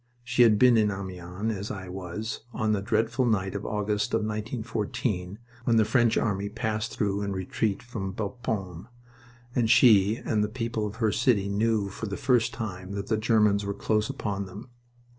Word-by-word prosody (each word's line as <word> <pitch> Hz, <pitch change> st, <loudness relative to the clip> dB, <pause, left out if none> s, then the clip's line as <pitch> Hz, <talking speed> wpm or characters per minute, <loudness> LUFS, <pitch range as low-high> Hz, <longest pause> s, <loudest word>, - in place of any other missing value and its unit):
She 120 Hz, 0 st, +1 dB
had 110 Hz, -3 st, +6 dB
been 125 Hz, +1 st, +6 dB
in 105 Hz, -1 st, +3 dB
Amiens, 95 Hz, +2 st, -4 dB
as 100 Hz, +2 st, -5 dB
I 95 Hz, -2 st, -6 dB
was, 95 Hz, +4 st, -5 dB
on 110 Hz, -2 st, +1 dB
a 100 Hz, -, -2 dB
dreadful 115 Hz, +4 st, +1 dB
night 100 Hz, -5 st, +1 dB
of 100 Hz, -, -4 dB
August 105 Hz, 0 st, -1 dB
of 115 Hz, -, +1 dB
1914, 110 Hz, -2 st, -3 dB, 0.3 s
when 120 Hz, -, +3 dB
the 110 Hz, -, +5 dB
French 115 Hz, +1 st, +3 dB
army 100 Hz, -2 st, 0 dB
passed 110 Hz, 0 st, -3 dB
through 100 Hz, -1 st, 0 dB
in 100 Hz, -1 st, -2 dB
retreat 95 Hz, +2 st, -2 dB
from 110 Hz, -5 st, -5 dB
Bapaume, 100 Hz, -4 st, -4 dB, 0.7 s
and 120 Hz, -3 st, +1 dB
she 110 Hz, -3 st, +6 dB
and 110 Hz, -2 st, -1 dB
the 105 Hz, -, -1 dB
people 115 Hz, -2 st, -2 dB
of 105 Hz, -, -7 dB
her 110 Hz, -2 st, +1 dB
city 115 Hz, -5 st, +2 dB
knew 105 Hz, 0 st, +1 dB
for 110 Hz, +3 st, -6 dB
the 100 Hz, -, -4 dB
first 120 Hz, -3 st, +2 dB
time 95 Hz, -4 st, -6 dB
that 100 Hz, 0 st, -5 dB
the 110 Hz, -, +3 dB
Germans 105 Hz, -2 st, +3 dB
were 100 Hz, 0 st, -3 dB
close 105 Hz, +2 st, 0 dB
upon 100 Hz, -7 st, -3 dB
them. 105 Hz, +7 st, -10 dB
105 Hz, 180 wpm, -27 LUFS, 100-115 Hz, 0.7 s, had